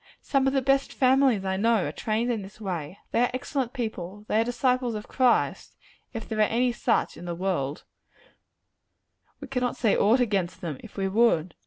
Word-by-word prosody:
Some 270 -1 +1
of 270 - +1
the 270 -1 +1
best 275 +1 +2
families 260 -6 +3
I 190 0 -1
know, 225 -1 +2
are 145 - -3
trained 225 +8 -1
in 225 -3 -2
this 195 +2 -12
way. 180 -4 -4
They 230 - +2
are 245 - +3
excellent 260 -1 -2
people; 210 -5 -5
they 220 - +2
are - - +3
disciples 245 0 0
of 210 - -6
Christ, 250 -2 +1 0.3
if 225 -2 -6
there 220 - -3
are - - +5
any 240 +4 +2
such 235 0 0
in 170 - -9
the 170 -1 -3
world: 165 -6 -2 1.6
we - - -8
cannot 250 -2 -1
say 220 - +2
aught 225 +5 +4
against 200 -7 0
them, 155 -6 -4
if 220 - -14
we 195 -1 0
would. 190 -5 +2
225 Hz, 195 wpm, -26 LUFS, 190-250 Hz, 1.6 s, are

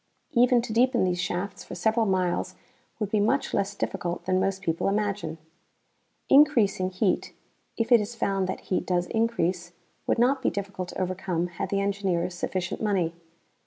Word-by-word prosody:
Even 245 -2 +4
to 220 - -4
deepen 245 0 +3
these 180 -1 0
shafts 180 +2 -3
for - - -8
several 220 0 +1
miles 185 -2 0 0.4
would 210 -2 -2
be 215 - +2
much 225 +7 +1
less 200 0 0
difficult 180 -3 -3
than 185 0 +2
most 195 0 -1
people 165 -2 0
imagine. 200 -5 -1 0.9
Increasing 235 -10 +4
heat, 185 +1 -1 0.4
if 230 +2 -1
it 235 -3 +7
is 215 +3 -5
found 195 -4 0
that 185 - -4
heat 185 - -2
does 180 -1 +1
increase, 185 -6 -1 0.3
would - - +2
not 260 +3 +3
be - - +2
difficult 195 -2 -5
to - - -7
overcome 180 -2 -1
had 175 +2 -4
the 200 0 0
engineers 190 -3 -1
sufficient 175 0 -3
money. 190 -6 +1
195 Hz, 165 wpm, -26 LUFS, 180-220 Hz, 0.9 s, it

